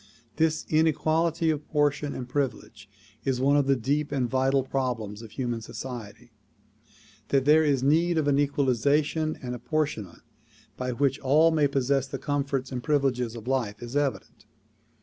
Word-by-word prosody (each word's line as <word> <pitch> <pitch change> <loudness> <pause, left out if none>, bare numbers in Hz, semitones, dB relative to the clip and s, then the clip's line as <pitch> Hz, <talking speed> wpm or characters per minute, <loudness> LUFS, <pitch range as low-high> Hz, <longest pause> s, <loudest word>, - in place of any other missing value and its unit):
This 160 0 +1
inequality 160 +1 +2
of 150 -1 -4
portion 145 -1 0
and 125 - -5
privilege 120 -6 -4 0.3
is 130 -2 0
one 140 +2 +3
of 145 -2 +2
the 135 - +4
deep 145 +5 -1
and 130 -4 0
vital 130 +2 +1
problems 120 -6 -3
of 115 - -10
human 120 0 -3
society. 120 -1 -8 1.0
That 135 -1 +1
there 155 +2 +6
is 140 -4 +1
need 165 +4 +3
of 155 -2 +1
an 140 -1 +3
equalization 145 +3 +1
and 125 -1 -4
apportionment 120 - -3 0.5
by 125 0 -3
which 135 +2 0
all 155 +5 +4
may 155 -2 +3
possess 135 0 0
the - - -5
com 145 -1 -1
forts 135 -2 -3
and 125 -2 -3
privileges 125 -5 0
of 115 0 -9
life 120 -6 -1
is 120 +3 -7
evident. 145 -2 -2
135 Hz, 160 wpm, -27 LUFS, 125-145 Hz, 1.0 s, there